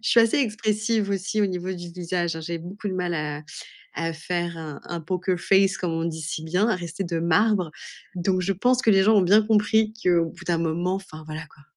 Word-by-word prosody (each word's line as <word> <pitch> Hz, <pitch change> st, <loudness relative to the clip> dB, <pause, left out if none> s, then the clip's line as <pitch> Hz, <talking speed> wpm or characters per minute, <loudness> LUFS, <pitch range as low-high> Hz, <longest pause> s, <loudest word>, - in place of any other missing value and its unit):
Je 220 Hz, -, -1 dB
suis 235 Hz, -, +6 dB
assez 230 Hz, +3 st, +3 dB
expressive 215 Hz, -3 st, 0 dB
aussi 200 Hz, +2 st, -1 dB
au 205 Hz, -, +4 dB
niveau 185 Hz, 0 st, -3 dB
du 175 Hz, -1 st, -7 dB
visage, 175 Hz, -1 st, -2 dB
hein, -, -, -5 dB
j'ai 170 Hz, +1 st, -4 dB
beaucoup 195 Hz, +5 st, -6 dB
de -, -, -3 dB
mal 180 Hz, -1 st, -1 dB
à 150 Hz, -2 st, -3 dB, 0.5 s
à 165 Hz, 0 st, -2 dB
faire 170 Hz, +1 st, -3 dB
un 155 Hz, -3 st, -7 dB
un 170 Hz, -1 st, -5 dB
Poker 180 Hz, +2 st, -1 dB
Face 195 Hz, +2 st, +3 dB
comme 175 Hz, -2 st, -2 dB
on 165 Hz, 0 st, -1 dB
dit 160 Hz, -1 st, -3 dB
si 155 Hz, 0 st, -4 dB
bien, 180 Hz, +7 st, +1 dB
à -, -, +2 dB
rester 175 Hz, +1 st, -5 dB
de 170 Hz, -2 st, -2 dB
marbre. 180 Hz, 0 st, +2 dB, 0.4 s
Donc 185 Hz, +1 st, +1 dB
je 195 Hz, +2 st, 0 dB
pense 245 Hz, +6 st, +2 dB
que 220 Hz, -, +5 dB
les 195 Hz, -1 st, +5 dB
gens 220 Hz, +2 st, +5 dB
ont 200 Hz, -, +6 dB
bien 205 Hz, +4 st, +6 dB
compris 215 Hz, 0 st, +3 dB
qu'au 175 Hz, -2 st, +4 dB
bout -, -, -12 dB
d'un 170 Hz, -2 st, +1 dB
moment, 170 Hz, +3 st, 0 dB
enfin, 160 Hz, -5 st, -9 dB
voilà 155 Hz, 0 st, -6 dB
quoi. 140 Hz, -, -21 dB
180 Hz, 235 wpm, -25 LUFS, 165-205 Hz, 0.5 s, suis